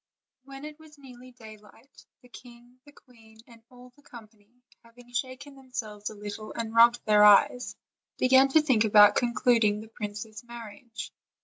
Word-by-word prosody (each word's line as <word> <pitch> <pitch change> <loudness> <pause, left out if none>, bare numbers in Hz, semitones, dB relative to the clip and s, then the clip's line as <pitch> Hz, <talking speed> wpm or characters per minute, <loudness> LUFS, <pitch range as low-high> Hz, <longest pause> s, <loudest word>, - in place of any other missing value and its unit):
When 275 +1 -11
it 300 +1 -11
was 310 -1 -18
nearly 255 -2 -15
daylight, 220 +1 -18 0.2
the - - -18
king, 245 0 -17
the - - -15
queen, 225 -6 -22
and 230 -2 -19
all 250 0 -17
the 290 - -24
company, 215 -6 -17 0.3
having 245 +1 -20
shaken 260 +3 -6
themselves 230 -6 -8
a 215 - -12
little 210 +1 -9
and 225 -1 -6
rubbed 235 +1 +4
their 210 -1 +4
eyes, 210 +4 +4 0.4
began 265 +1 +4
to 310 +3 +3
think 255 -7 +2
about 205 -1 +5
concluding 235 -3 +1
the 220 +1 -12
princess' 215 0 -8
marriage. 235 -1 -11
235 Hz, 155 wpm, -26 LUFS, 215-255 Hz, 0.4 s, about